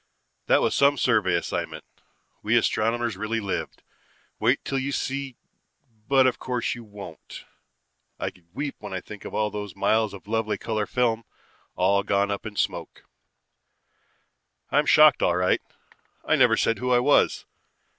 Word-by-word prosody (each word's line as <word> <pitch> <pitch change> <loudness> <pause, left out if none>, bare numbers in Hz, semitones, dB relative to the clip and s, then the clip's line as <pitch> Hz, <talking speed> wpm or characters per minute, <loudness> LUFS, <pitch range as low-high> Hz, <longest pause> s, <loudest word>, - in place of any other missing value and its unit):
"That - - +4
was - - +1
some 140 +1 +4
survey 110 -9 +2
assignment. 85 - -3 0.6
We - - +2
astronomers 115 +1 0
really 115 +1 -2
lived. 100 -3 -4 0.6
Wait 120 +5 +1
till 135 - -1
you 135 +1 -2
see 135 -2 -3 0.7
but 135 -1 +5
of 130 - +1
course 125 -2 -2
you 120 - -9
won't. 100 -6 -11 0.7
I - - -3
could 85 -2 -25
weep 140 +7 -4
when 105 -2 -8
I - - -2
think 105 +2 -11
of - - -7 0.2
those 105 -3 -6
miles 110 +1 +1
of 100 - -14
lovely 110 0 -1
color 110 -2 -2
film, 115 -2 0 0.5
all 100 0 +3
gone 100 0 0
up 100 +2 -4
in 105 - -9
smoke. - - -3 1.7
"I'm 145 +2 +2
shocked 155 0 +6
all 85 - +2
right. 90 0 +2 0.6
I - - +3
never - - +4
said 115 - +1
who 125 0 -2
I 125 - +5
was. 135 +4 +3
115 Hz, 155 wpm, -25 LUFS, 100-125 Hz, 1.7 s, shocked